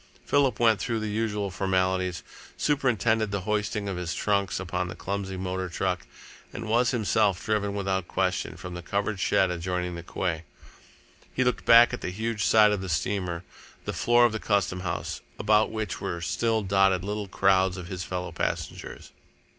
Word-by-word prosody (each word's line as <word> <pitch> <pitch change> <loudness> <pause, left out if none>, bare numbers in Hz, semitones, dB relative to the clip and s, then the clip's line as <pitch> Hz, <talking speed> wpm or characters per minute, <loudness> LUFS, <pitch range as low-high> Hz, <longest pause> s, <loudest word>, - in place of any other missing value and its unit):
Philip 140 -5 +2
went 115 -3 +4
through 115 +6 -1
the 110 -1 -3
usual 105 -2 -1
formalities, 95 -1 0 0.3
superintended 120 -6 +1
the 100 -1 -2
hoisting 105 +1 -1
of 95 -2 -3
his 90 -2 -3
trunks 100 -3 0
upon 90 -1 -2
a - - -6
clumsy 95 -1 -4
motor 95 0 -3
truck, 90 +1 -2 0.4
and 115 - -6
was 120 +2 +3
himself 105 -5 +1
driven 100 -2 0
without 95 -2 -1
question - - -1
from 90 +1 -7
the 90 - -6
covered 100 +3 -2
shed 95 0 +2
adjoining 90 0 -2
the 85 - -6
quay. 85 -1 -2 0.9
He 130 - +1
looked 125 -1 0
back 120 +1 +8
at 125 - -4
the - - -3
huge 110 +3 -2
side 105 -1 +6
of 105 -2 -1
the 95 - -5
steamer, 85 +2 -1 0.4
the - - -3
floor 120 0 +4
of 120 - +3
the 110 - -3
Custom 100 -4 0
House, 90 - -4 0.2
about 105 +1 +3
which 110 -3 -4
were 85 - -3
still 110 +6 0
dotted 95 -1 +3
little 105 0 -3
crowds 95 -1 +2
of 90 - -6
his 95 -1 -5
fellow 90 0 -4
passengers. - - -4
100 Hz, 175 wpm, -27 LUFS, 90-110 Hz, 0.9 s, back